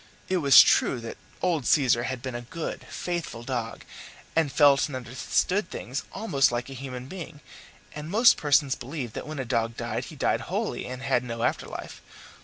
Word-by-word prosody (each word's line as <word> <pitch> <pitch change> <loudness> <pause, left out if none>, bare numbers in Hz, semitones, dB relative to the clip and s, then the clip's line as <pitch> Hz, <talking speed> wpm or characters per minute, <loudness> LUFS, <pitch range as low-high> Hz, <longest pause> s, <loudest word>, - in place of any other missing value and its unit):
It 185 - +2
was 140 -6 +9
true 125 - +2
that 115 - -8 0.2
old 165 -8 +1
Caesar 125 -5 +3
had 130 -1 -4
been 130 -2 -4
a 120 - -4
good, 155 +7 -6
faithful 170 -10 -4
dog, 120 -3 -4 0.5
and 160 -4 +2
felt 140 -2 +5
and 145 - -7
understood 130 - -1
things 130 +4 -5
almost 140 - +2
like 120 +3 -3
a - - -6
human 130 -1 -7
being, 165 -1 -8 0.5
and 150 +1 -7
most 225 +6 +6
persons 145 -2 +3
believed 125 -3 -6
that - - -6
when 155 0 -6
a 135 - -3
dog 115 0 -1
died - - -3
he - - -10
died - - +1
wholly - - -2
and 125 +1 -7
had 125 - +1
no 115 -1 -4
after - - 0
life. - - -8
135 Hz, 190 wpm, -26 LUFS, 120-155 Hz, 0.5 s, was